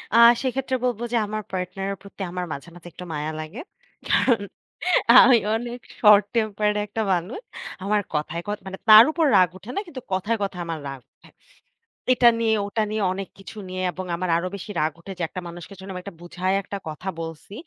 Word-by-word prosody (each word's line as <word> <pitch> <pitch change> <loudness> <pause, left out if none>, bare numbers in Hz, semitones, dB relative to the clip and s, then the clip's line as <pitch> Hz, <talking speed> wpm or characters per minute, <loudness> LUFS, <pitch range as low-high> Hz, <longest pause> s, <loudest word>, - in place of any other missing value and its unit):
আ - - +6 0.2
সেক্ষেত্রে 260 0 -1
বলব 240 -3 0
যে - - +3
আমার 215 +1 -3
পার্টনার 185 +1 -3
এর 195 - -5
প্রতি 200 0 -12
আমার 180 0 -3
মাঝে, 140 +5 -8
মাঝে 175 0 -12
একটু 180 - -9
মায়া 150 +1 -3
লাগে। 155 +10 -7 0.5
কারণ 235 -5 +3 0.8
আমি 240 -1 +7 0.2
অনেক 240 +1 -4 0.2
শর্ট 210 -2 +7
টেম্পারড 210 -1 +1
একটা 215 +2 -4
মানুষ। 180 - -3 0.4
আমার 210 +1 +1
কথায়, 155 +3 -2
কথায় 205 0 -2
ক - - -24
মানে 190 0 -6
তার 215 +1 +12
উপর 325 0 +1
রাগ 180 -2 +5
উঠে 210 +6 -9
না - - +1
কিন্তু 265 -6 -8
কথায়, 205 +5 0
কথায় 180 -3 -3
আমার 165 -1 -3
রাগ 135 -1 -7
উঠে। - - -21 0.8
এটা 245 -1 +6
নিয়ে 225 -1 +2
ওটা 215 +1 0
নিয়ে 215 -1 -1
অনেক 195 0 -5
কিছু 195 +3 -11
নিয়ে 185 0 -4
এবং 185 +1 -6
আমার 180 +1 -3
আরো 175 - -2
বেশি 200 +2 -7
রাগ 155 +1 +1
উঠে 195 - -9
যে - - -1
একটা 185 - -6
মানুষকে 175 +3 -9
যখন 190 0 -8
এটা 200 -1 -8
বুঝাই 180 +2 -2
একটা 200 +1 -5
কথা 155 +5 -8
বলছি। 165 +3 -8
195 Hz, 200 wpm, -24 LUFS, 175-220 Hz, 0.8 s, তার